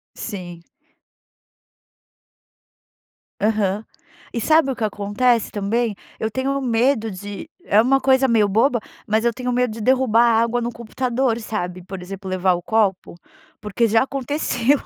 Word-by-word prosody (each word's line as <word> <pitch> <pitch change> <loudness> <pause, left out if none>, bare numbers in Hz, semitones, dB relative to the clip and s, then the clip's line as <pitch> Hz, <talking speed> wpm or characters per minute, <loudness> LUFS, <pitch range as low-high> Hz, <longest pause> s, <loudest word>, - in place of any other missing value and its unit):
Sim. 175 -6 -7 2.8
Aham. 210 -1 0 0.5
E 235 - -2
sabe 310 +2 +3
o 260 - -3
que 220 - -2
acontece 210 +3 +1
também? 215 +2 -1 0.3
Eu 220 - -1
tenho 270 +3 -1
medo 235 -2 +1
de 200 +8 -8 0.2
é 210 - +4
uma 270 +4 +3
coisa 265 0 +4
meio 220 -3 +3
boba, 235 +5 +2 0.3
mas 220 +1 +1
eu 235 - +3
tenho 250 +2 -4
medo 250 -2 +1
de 225 - -8
derrubar 245 -1 +3
água 235 +1 +2
no 235 +1 -2
computador, 235 +1 -1
sabe? 185 -5 -4
Por 185 0 -8
exemplo, 195 +1 -8
levar 185 0 +2
o 175 - -4
copo, 200 -2 0 0.5
porque 210 +3 0
já 225 +3 +4
aconteceu. 275 -1 0
225 Hz, 140 wpm, -21 LUFS, 205-250 Hz, 2.8 s, é